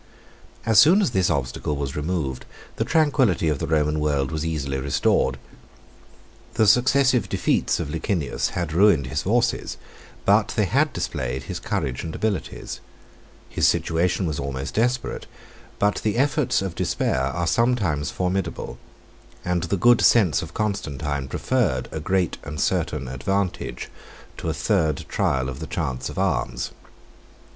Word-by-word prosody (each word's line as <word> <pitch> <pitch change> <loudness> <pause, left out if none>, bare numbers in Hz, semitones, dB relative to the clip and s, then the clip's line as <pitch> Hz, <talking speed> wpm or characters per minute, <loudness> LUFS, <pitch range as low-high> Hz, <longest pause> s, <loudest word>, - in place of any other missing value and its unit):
As 110 -2 +5
soon 165 - +7
as 195 - +1
this 95 -5 +2
obstacle 70 +2 -2
was 70 -1 -4
removed, 75 -5 -2 0.3
the - - +1
tranquillity 135 - +2
of 75 -3 -1
the - - -2
Roman 75 -1 +1
world 70 -3 0
was 80 -1 -2
easily 70 -4 -2
restored. 70 +1 +1 1.2
The 110 - +4
successive 125 +3 +4
defeats - - +1
of 75 - -3
Licinius 80 -1 -1
had 85 -3 -2
ruined 85 -6 +4
his 65 - -2
forces, - - 0 0.5
but - - +3
they - - +2
had - - +2
displayed 65 +1 -3
his - - -5
courage 65 -2 -2
and 80 - -5
abilities. 110 -3 -3 0.7
His - - +2
situation 90 +3 +1
was 75 -4 -2
almost 70 0 -4
desperate, 120 +3 -1 0.5
but 105 0 +1
the 110 0 -1
efforts 140 -5 +2
of 95 -3 -3
despair 65 - 0
are 70 +6 -1
sometimes 95 - +1
formidable, 90 +1 -3 0.7
and 90 -1 0
the 90 +4 -1
good 120 +5 +5
sense 90 - +4
of 80 +1 -9
Constantine 75 -9 -2
preferred 85 - 0
a 80 - -4
great 90 +2 0
and 75 +1 -6
certain 65 0 0
advantage 95 +9 -2 0.5
to 80 - -3
a - - 0
third 80 -4 0
trial 65 -1 0
of 70 0 -6
the 80 - -6
chance 65 -7 -3
of - - -9
arms. - - -1
80 Hz, 145 wpm, -23 LUFS, 70-105 Hz, 1.2 s, soon